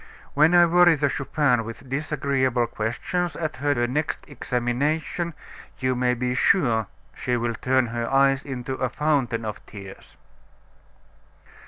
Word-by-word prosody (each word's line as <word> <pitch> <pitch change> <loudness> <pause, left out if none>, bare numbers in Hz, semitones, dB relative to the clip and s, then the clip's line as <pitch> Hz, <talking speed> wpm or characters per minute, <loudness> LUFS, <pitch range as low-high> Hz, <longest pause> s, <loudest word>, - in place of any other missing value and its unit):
When 155 +4 +4
I 175 0 +7
worry 175 0 +5
the 145 -1 +1
Chupin 135 -3 +1
with 115 +4 -9
disagreeable 135 -3 0
questions, 120 +11 -3
at 155 -2 -4
her 140 -3 +1
next 145 +6 -2
examination, 145 +6 -2 0.4
you 130 0 0
may 125 0 +1
be 125 +1 -1
sure 120 - +2 0.3
she 125 -1 -1
will 120 0 -1
turn 130 +2 +1
her 115 +1 -3
eyes 135 0 +3
into 130 -2 -5
a 130 -1 -1
fountain 130 -6 0
of 105 - -6
tears." 100 -2 -12
130 Hz, 135 wpm, -24 LUFS, 120-150 Hz, 0.4 s, I